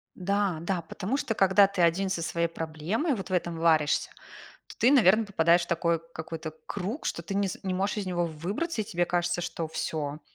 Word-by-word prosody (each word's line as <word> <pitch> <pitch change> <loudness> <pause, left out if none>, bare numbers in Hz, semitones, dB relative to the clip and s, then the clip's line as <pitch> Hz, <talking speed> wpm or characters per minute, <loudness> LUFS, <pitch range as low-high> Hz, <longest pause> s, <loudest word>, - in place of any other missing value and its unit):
Да-да. 185 -2 -1
Потому 195 - -3
что, 225 - -2
когда 195 +1 +5
ты 195 -3 -1
1 180 +3 +3
со 165 - -1
своей 170 +1 0
проблемой, 165 - -2
вот 195 -3 -6
в - - -4
этом 175 -2 0
варишься, 160 -2 +2 0.6
то - - -13
ты, 245 - +5
наверно, 220 -4 +5
попадаешь 175 -3 +3
в - - -5
такой 170 -1 +1
какой-то 160 0 -6
круг, 205 - -4
что 170 - -2
ты 195 - -5
не 200 -1 +1
с - - -7
не 185 -1 -2
можешь 195 +3 -1
из 200 - -3
него 175 -1 0
выбраться, 200 - -3
и - - -1
тебе 175 -3 0
кажется, 175 0 0
что 165 -1 -3
всё, 150 -1 -3
175 Hz, 205 wpm, -28 LUFS, 165-200 Hz, 0.6 s, когда